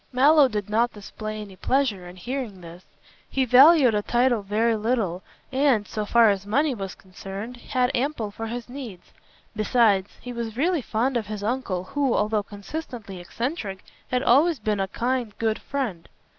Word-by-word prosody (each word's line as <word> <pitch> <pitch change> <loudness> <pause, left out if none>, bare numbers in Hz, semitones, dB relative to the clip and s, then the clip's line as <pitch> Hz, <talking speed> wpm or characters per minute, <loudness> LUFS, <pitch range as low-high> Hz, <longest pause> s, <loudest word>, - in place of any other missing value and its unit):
Mallow 280 +3 +6
did 210 -5 -3
not 230 +3 +1
display 215 +1 -7
any 200 -2 -10
pleasure 210 -4 0
on 175 - -11
hearing 230 -1 -5
this. 170 +1 -11 0.5
He 265 -1 +1
valued 265 +1 +7
a 210 - +1
title 240 +1 +2
very 220 +3 +1
little 215 -5 -1 0.3
and, 265 -6 +2
so 215 -1 -3
far 230 -2 +5
as 195 -1 -2
money 280 +7 +2
was 195 -5 -6
concerned, 195 +5 -8
had 250 +1 0
ample 245 -5 -1
for 225 +2 -6
his 240 +1 -5
needs. 245 -9 -9 0.4
Besides, 215 -3 +3
he 245 - -7
was 230 -1 -5
really 335 +3 +1
fond 240 +3 0
of 220 -4 -3
his 210 -1 -5
uncle 210 -6 -2
who, 275 +5 0
although 210 0 +1
consistently 205 - -7
eccentric, 205 - -4 0.3
had 250 0 0
always 305 +6 +4
been 210 -2 -1
a 195 - 0
kind, 240 +1 -2
good 220 -1 0
friend. 235 -12 -4
225 Hz, 170 wpm, -25 LUFS, 205-255 Hz, 0.5 s, valued